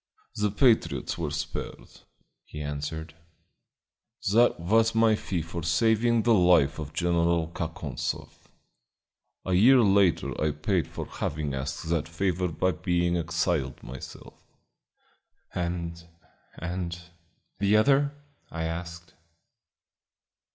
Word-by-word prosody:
"The 105 0 +1
patriots 100 - +2
were 80 -3 -1
spared," 75 +1 -6 0.4
he 75 - -10
answered. 75 +2 -5 1.2
"That 120 -3 +4
was 115 +6 +2
my 115 -1 +5
fee 95 -5 -2
for 85 +1 -6
saving 110 +7 +2
the 120 - +4
life 90 -7 +4
of 75 -2 -6
General 85 -1 +1
Kakonzoff. 80 -6 -5 1.0
A 95 - -1
year 125 +8 +6
later 100 -4 +3
I 75 -1 +1
paid 85 +4 0
for - - -6
having 75 -1 -3
asked 70 +4 -4
that 80 -2 0
favor 90 +1 -1
by 90 +2 0
being 85 +1 0
exiled 80 -4 -1
myself." 65 +2 -10 1.1
"And 85 -1 -3 0.5
and 85 0 -4 0.6
the 100 +2 +4
other?" 140 +5 +4 0.4
I 80 0 -4
asked. 85 0 -6
85 Hz, 110 wpm, -27 LUFS, 80-100 Hz, 1.2 s, year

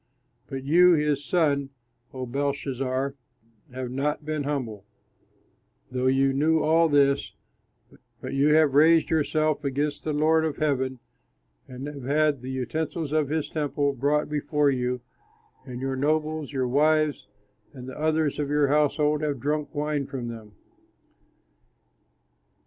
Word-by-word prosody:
"But 135 -1 -6
you, 175 +5 +5
his 150 -2 +1
son, 140 -4 +1 0.4
O 130 -1 -5
Belshazzar, 135 0 -2 0.6
have 125 -1 -5
not 145 +3 -2
been 155 -2 -2
humble, 120 -9 -3 1.1
though 130 0 0
you 135 +1 +3
knew 155 +4 +2
all 160 +2 +3
this, 140 -1 +2 0.8
but - - -6
you 135 +2 +3
have 155 -3 +4
raised 160 +3 +5
yourself 155 -1 +1
against 145 +2 -2
the 155 - -2
Lord 155 +2 +3
of 155 -2 -2
heaven, 130 -4 0 0.7
and 130 +1 -8
have 145 -3 -7
had 150 -1 +1
the 130 - -7
utensils 145 +5 -3
of 155 -2 +1
his 155 0 -1
temple 145 -2 -1
brought 145 +3 0
before 150 -1 +1
you, 125 -1 -2 0.7
and 125 0 -7
you, 135 - -2
your 135 - -2
nobles, 155 +1 -1
your 130 -3 -1
wives, 150 0 +2 0.4
and 130 -2 -10
the 130 - -8
others 155 -1 0
of 145 -1 -2
your 145 -1 +2
household 150 +1 +2
have 145 -3 -2
drunk 150 +4 -2
wine 145 -1 -1
from 125 -4 -5
them. 110 -3 -10
145 Hz, 140 wpm, -25 LUFS, 135-155 Hz, 1.1 s, you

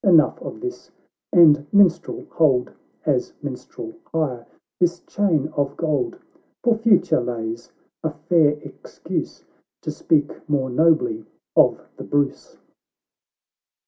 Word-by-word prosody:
— - - -68
Enough 155 - +4
of 330 - -8
this 370 0 -6 0.2
— - - -68
And, 150 -4 +6
Minstrel, 185 -4 +3
hold, 135 -6 +2 0.3
As - - 0
minstrel 345 -2 -7 0.2
hire, 130 -7 -2 0.3
this 175 0 +1
chain 165 -8 0
of 145 -3 -2
gold, 170 - -1 0.5
For 235 -1 +4
future 220 - +3
lays 115 -1 -5 0.3
a 160 - +1
fair 150 -1 +2
excuse, - - -6 0.4
To - - -3
speak 150 -1 -1
more 135 -3 0
nobly 155 -6 +2 0.3
of - - +5 0.2
the - - -7
Bruce." 145 -1 -2
155 Hz, 120 wpm, -22 LUFS, 140-175 Hz, 0.5 s, And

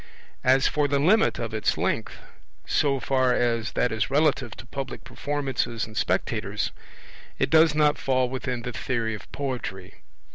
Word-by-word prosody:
As 130 +1 +4
for 145 -1 +1
the 140 0 +1
limit 195 +11 +3
of 115 -1 -4
its 110 - 0
length, - - -1 0.5
so 140 -2 +1
far 130 -1 +2
as 115 -2 0
that 125 - +1
is 110 +3 -1
relative 145 -5 +1
to - - -10
public 135 +1 -6
performances 135 -6 -2
and 110 -1 -13
spectators, - - -1 0.7
it - - 0
does 160 -1 +6
not 150 -1 +3
fall 130 -1 +1
within 125 -1 -4
the 125 - -5
theory 115 -4 -2
of 105 - -9
poetry. 120 -9 -5
130 Hz, 155 wpm, -26 LUFS, 115-145 Hz, 0.7 s, does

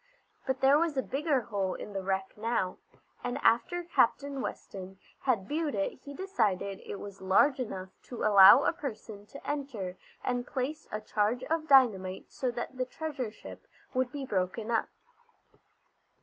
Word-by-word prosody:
But 265 0 -1
there 275 +2 +6
was 325 -3 0
a 265 - +2
bigger 280 0 0
hole 200 -4 -2
in 210 - -8
the 195 - -2
wreck 190 0 -2
now, 210 -4 -1 0.4
and 245 +2 -2
after 240 +11 +3
Captain 280 -3 +1
Weston 190 -5 -6 0.2
had 225 -8 0
viewed 305 -3 -1
it 195 -1 0
he 285 +1 -9
decided 210 - -1
it - - -7
was 200 -1 -9
large 255 +9 +4
enough 190 -6 -4 0.2
to 245 - -6
allow 205 +5 +9
a - - +2
person 220 - -7
to 280 - -11
enter 240 -11 -3 0.3
and 245 -1 -1
place 275 +4 -3
a 215 - -3
charge 215 +4 0
of 325 -1 0
dynamite 210 -10 +4
so 255 - -2
that 240 +2 -5
the 255 - 0
treasure 275 -4 -4
ship 225 - -12 0.3
would 255 -1 0
be 280 -2 -5
broken 205 +2 -2
up. 225 - +1
245 Hz, 165 wpm, -30 LUFS, 200-280 Hz, 0.4 s, allow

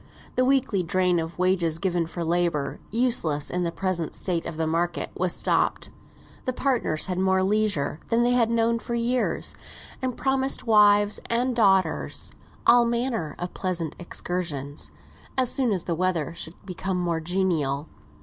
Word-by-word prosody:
The 255 - +3
weekly 255 -7 +2
drain 180 0 +1
of 165 +1 -5
wages 180 -3 +2
given 175 -2 0
for 170 +1 -5
labour, 165 -4 0
useless 215 - +1
in 180 - -1
the 170 -1 0
present 185 -3 -2
state 175 -3 -1
of 155 - -6
the 160 - 0
market, 170 +2 -1
was 180 0 0
stopped. - - 0 0.5
The 255 - -1
partners 245 - 0
had 185 -1 -2
more 190 0 +2
leisure 200 -7 0
than 235 +1 +2
they 245 - +3
had 240 -2 +3
known 230 0 +2
for 235 +1 -4
years; 240 +2 0 0.5
and 255 -2 -2
promised 265 0 0
wives 205 -2 +5
and 245 +2 +1
daughters 195 -5 +2 0.3
all 240 0 +7
manner 235 - -1
of 175 0 -5
pleasant 170 -5 -3
excursions, 170 -5 -4 0.5
as 255 -2 +2
soon 255 -4 +1
as 185 -4 0
the 170 - -2
weather 170 -3 0
should 165 0 -7
become 190 0 -3
more 170 -2 0
genial. 160 -5 0
185 Hz, 160 wpm, -25 LUFS, 170-230 Hz, 0.5 s, all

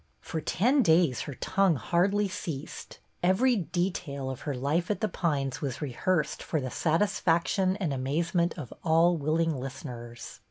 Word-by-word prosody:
For 160 - -4
ten 250 - +2
days 160 - +3
her 140 - -6
tongue 195 +2 +2
hardly 185 - +1
ceased. 160 -6 -6 0.2
Every 215 +8 +3
detail 175 -7 -2
of 130 - -8
her 140 - -1
life 145 +7 0
at 205 -3 0
The 215 - +1
Pines 145 -8 -1
was 135 -5 -3
rehearsed 150 +5 -1
for 155 - -1
the 130 -2 -4
satisfaction 185 +1 +1
and 175 -8 -1
amaze 145 +6 -1
ment 170 -1 +1
of 140 -8 -7
all 165 +2 +4
willing 160 +1 +1
listeners. 125 -3 -7
165 Hz, 155 wpm, -28 LUFS, 140-185 Hz, 0.2 s, all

